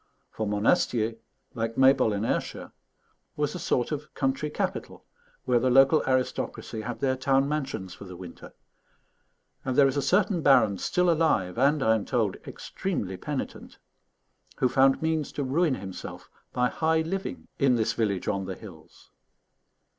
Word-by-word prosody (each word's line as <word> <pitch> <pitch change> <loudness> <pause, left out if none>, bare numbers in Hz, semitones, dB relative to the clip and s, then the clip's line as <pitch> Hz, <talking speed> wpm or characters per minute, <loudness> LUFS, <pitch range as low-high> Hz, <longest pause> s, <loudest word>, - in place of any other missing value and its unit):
For 110 - -3
Monastier, 110 +2 +1 0.4
like 115 0 -3
Maybole 130 -4 +5
in 100 +2 -1
Ayrshire, - - -3 0.6
was 150 -1 -1
a 180 - -5
sort 125 -6 0
of 150 0 -5
country 135 +2 -1
capital, - - -4 0.4
where 120 - +3
the 130 - +1
local 135 +4 +6
aristocracy 130 -3 -1
had 120 +2 -6
their 130 -1 +2
town 135 +1 +2
mansions 135 -11 -3
for 100 - -11
the 90 -1 -9
winter; 90 -1 -11 1.1
and 130 - -2
there 140 0 +6
is 135 - -1
a - - +2
certain 185 +5 +2
baron 110 -9 +4
still 180 0 +1
alive 155 - +1
and, 140 +2 +3
I 110 - +4
am 110 -3 -1
told, 110 -7 0
extremely 105 - -4
penitent, 140 +9 -6 0.8
who 130 - +3
found 135 +3 +3
means 160 -2 0
to 145 - -2
ruin 145 +2 +1
himself 95 -5 -8 0.2
by 125 0 +1
high 160 0 +1
living 190 +4 -4
in 135 -3 +4
this 110 -2 0
village 100 -5 -1
on 100 -1 -1
the 95 0 -5
hills. 90 -8 -14
130 Hz, 155 wpm, -27 LUFS, 110-150 Hz, 1.1 s, local